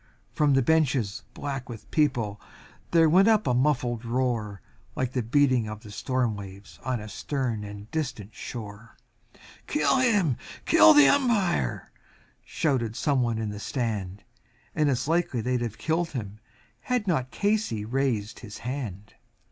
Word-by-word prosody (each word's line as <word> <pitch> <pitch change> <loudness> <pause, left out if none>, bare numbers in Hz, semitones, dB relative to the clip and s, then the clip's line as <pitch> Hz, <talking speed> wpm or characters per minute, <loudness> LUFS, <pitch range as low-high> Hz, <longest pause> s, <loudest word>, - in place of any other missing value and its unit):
From 145 -2 +3
the 135 - +3
bleachers 130 -8 +1
black 135 -3 -5
with 115 -3 -10
people 120 -10 0 0.5
there 165 -1 +5
rose 185 +6 +5
a 220 -1 +6
sullen 125 -2 +1
roar, 115 -4 -1 0.4
Like 130 -1 -1
the 125 - -1
beating 125 -1 +2
of 105 0 -7
the 105 - -11
storm 125 0 -1
waves 100 0 -11
on 130 -2 -1
a 105 - -8
stern 120 0 -3
and 105 0 -8
distant 115 -10 -4
shore, 110 0 -8 0.7
"Kill 300 -2 +2
him! 205 - +2 0.3
kill 105 0 +7
the 145 -1 +8
Umpire!" 200 - +1 0.5
shouted 120 -7 -1
some 140 -1 +1
one 120 -2 0
from 110 -1 -2
the 105 0 -6
stand 105 -6 -3 0.5
And 150 -1 +2
it's 130 0 0
likely 165 -6 +1
they'd 125 +2 -1
have 115 -3 -4
done 165 +6 0
it 110 -5 -3 0.5
had 250 -4 -1
not 130 -9 0
Casey 205 - 0
raised 120 -3 -1
his 105 -4 -9
hand. 110 -7 -5
125 Hz, 150 wpm, -26 LUFS, 110-150 Hz, 0.7 s, the